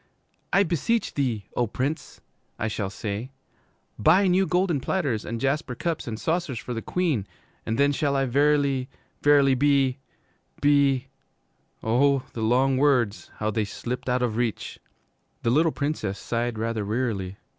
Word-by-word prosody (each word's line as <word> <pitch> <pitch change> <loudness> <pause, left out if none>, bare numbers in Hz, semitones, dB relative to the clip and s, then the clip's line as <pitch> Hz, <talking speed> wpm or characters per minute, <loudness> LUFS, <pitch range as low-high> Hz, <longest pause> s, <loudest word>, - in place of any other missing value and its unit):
'"I 195 - +5
beseech 200 +7 0
thee, 120 -8 -1
O 120 - +1
Prince," 135 +8 -4 0.4
I 110 - -1
shall 105 -2 -2
say, 105 +4 -5 0.7
"buy 180 +6 +5
new 185 +1 +3
golden 180 -4 +1
platters 135 - -1
and 115 0 -4
jasper 135 0 -1
cups 165 +2 -3
and 110 -1 -4
saucers 160 -5 -1
for 120 +2 -5
the 115 - -3
Queen, 155 - -1 0.4
and 115 0 -1
then 140 0 +4
shall 140 0 0
I 135 0 +2
verily, 140 0 +2 0.3
verily 145 -2 +5
be 135 -1 +2 0.6
be 140 -2 +3 0.4
"' - - -41
Oh, 135 +4 +3
the 115 - -5
long 130 +4 +3
words 125 -7 +2
how 110 0 -1
they 110 +1 0
slipped 125 +5 -5
out 125 0 +1
of 115 -3 -1
reach! 120 -3 -2 0.6
The 115 - +2
little 160 +5 +3
Princess 140 -11 -2
sighed 115 +2 -2
rather 115 -1 -2
wearily. 100 -4 -2
130 Hz, 155 wpm, -25 LUFS, 115-145 Hz, 0.7 s, I